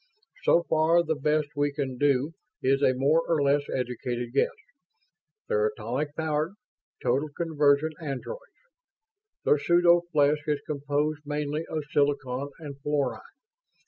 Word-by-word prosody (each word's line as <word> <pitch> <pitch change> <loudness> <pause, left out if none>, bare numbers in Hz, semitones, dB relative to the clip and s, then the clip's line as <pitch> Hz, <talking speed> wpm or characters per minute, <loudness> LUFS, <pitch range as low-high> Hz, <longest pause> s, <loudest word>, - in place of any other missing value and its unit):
"So 170 - +5
far, 160 +2 +3
the 160 -1 0
best 150 0 0
we 145 0 +1
can 135 -3 -4
do 145 +2 +2 0.3
is 135 +1 +3
a 130 -2 +4
more 145 +5 +3
or 165 -2 +2
less 140 +1 +3
educated 125 -1 -3
guess. 140 - +3 1.0
They're 450 -2 +2
atomic 150 - -3
powered, 160 +3 -1 0.5
total 140 +5 +1
conversion 150 -1 +2
androids. 150 - -5 1.0
Their 150 - +4
pseudo 175 +3 +5
flesh 150 -1 +3
is 150 -1 +1
composed 145 +1 -1
mainly 150 +1 -3
of 155 -1 -3
silicon 140 -2 0
and 140 -4 -9
fluorine. 145 -2 -1
145 Hz, 130 wpm, -27 LUFS, 140-155 Hz, 1.0 s, So